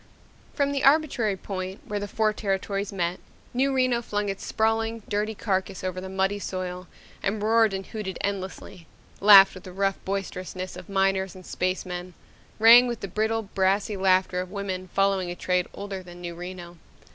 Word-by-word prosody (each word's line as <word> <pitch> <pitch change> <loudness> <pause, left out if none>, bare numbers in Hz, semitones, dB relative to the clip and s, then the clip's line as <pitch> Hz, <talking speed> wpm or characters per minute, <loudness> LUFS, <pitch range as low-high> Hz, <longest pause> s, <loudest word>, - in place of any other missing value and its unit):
From 280 -1 +1
the 275 -1 -1
arbitrary 270 -8 +3
point 190 0 -5
where 210 0 -3
the 205 - -4
four 215 +1 +1
territories 195 -1 -2
met, 180 -2 -2 0.3
New 270 +3 +2
Reno 255 -2 +2
flung 205 -3 -2
its 195 - -5
sprawling, 225 0 0
dirty 210 +2 -1
carcass 190 -2 -2
over 185 0 -3
the 190 - -7
muddy 190 +2 0
soil 180 -2 -5 0.3
and 205 +2 -1
roared 220 +1 +3
and 190 0 -4
hooted 210 -4 -5
endlessly, 190 -3 -5 0.3
laughed 195 -1 +9
with 185 - -10
the 185 - -9
rough 195 +1 -1
boisterousness 185 -1 -4
of - - -10
miners 195 -1 +1
and 185 -1 -12
spacemen, 180 -1 -3 0.4
rang 235 +3 +8
with 235 -2 -4
the 195 - -4
brittle, 220 +4 0
brassy 195 +1 0
laughter 185 -1 +2
of 185 - -7
women 190 -2 -4
following 195 -2 +1
a 175 - -4
trade 180 0 0
older 200 -1 -6
than 175 -1 -12
New 175 -1 -6
Reno. 175 0 -8
195 Hz, 170 wpm, -26 LUFS, 185-215 Hz, 0.4 s, laughed